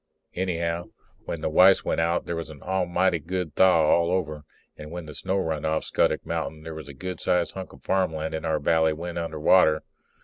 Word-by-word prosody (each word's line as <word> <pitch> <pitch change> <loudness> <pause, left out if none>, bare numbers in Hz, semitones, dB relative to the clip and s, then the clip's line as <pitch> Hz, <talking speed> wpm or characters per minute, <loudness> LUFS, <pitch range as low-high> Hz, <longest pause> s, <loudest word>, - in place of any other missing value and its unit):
Anyhow, 85 -2 -2 0.4
when 85 - -4
the 80 - -1
ice 95 +4 +6
went - - 0
out 85 +1 0
there 85 - -3
was 85 -1 -5
an 75 -3 -12
almighty 90 -1 +1
good 90 0 -4
thaw 90 -3 +5
all 85 +2 +3
over, 75 -5 -2 0.3
and 75 0 -10
when 85 0 -6
the 75 - -9
snow 95 +5 -2
run 80 -5 -2
off 80 0 0
Scuttock - - 0
mountain 80 -1 -4
there 80 0 -7
was 80 -2 -8
a 70 - -10
good 90 +5 -6
sized 85 -3 +1
hunk 95 -1 -7
of - - -17
farmland 80 -5 0
in 80 - -3
our 80 -1 0
valley 80 +1 +2
went 85 +2 -5
under 80 -2 -4
water. 80 -1 +4
85 Hz, 210 wpm, -25 LUFS, 80-90 Hz, 0.4 s, ice